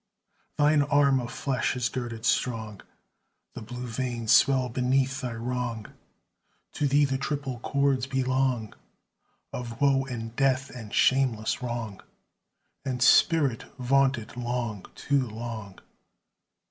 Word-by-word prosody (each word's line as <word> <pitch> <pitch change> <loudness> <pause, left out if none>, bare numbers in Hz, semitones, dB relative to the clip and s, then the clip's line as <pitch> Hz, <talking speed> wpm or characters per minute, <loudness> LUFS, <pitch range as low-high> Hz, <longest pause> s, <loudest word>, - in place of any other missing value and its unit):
Thine 150 0 +4
arm 140 -2 +3
of 120 -1 -5
flesh 130 -2 -1
is 125 -1 0
girded 120 -2 -5
strong; 110 -6 -1 0.7
The - - -8
blue 125 +3 -7
veins 120 -1 -2
swell 130 -1 +5
beneath 130 +2 0
thy 125 -3 -3
wrong; 115 -1 -4 0.8
To 145 - 0
thee 145 +1 +4
the 135 -1 -1
triple 140 -3 -3
cords 140 0 +1
belong 130 -4 0 0.8
Of 120 -2 -6
woe 135 -1 +3
and 115 -3 -6
death 135 0 +1
and 110 -5 -9
shameless 130 -4 +2
wrong, 120 -5 -4 0.8
And 130 -2 -3
spirit 155 - +4
vaunted 130 -2 +1
long, 120 -4 -3
too 140 -3 0
long! 110 -3 -7
125 Hz, 120 wpm, -27 LUFS, 115-135 Hz, 0.8 s, swell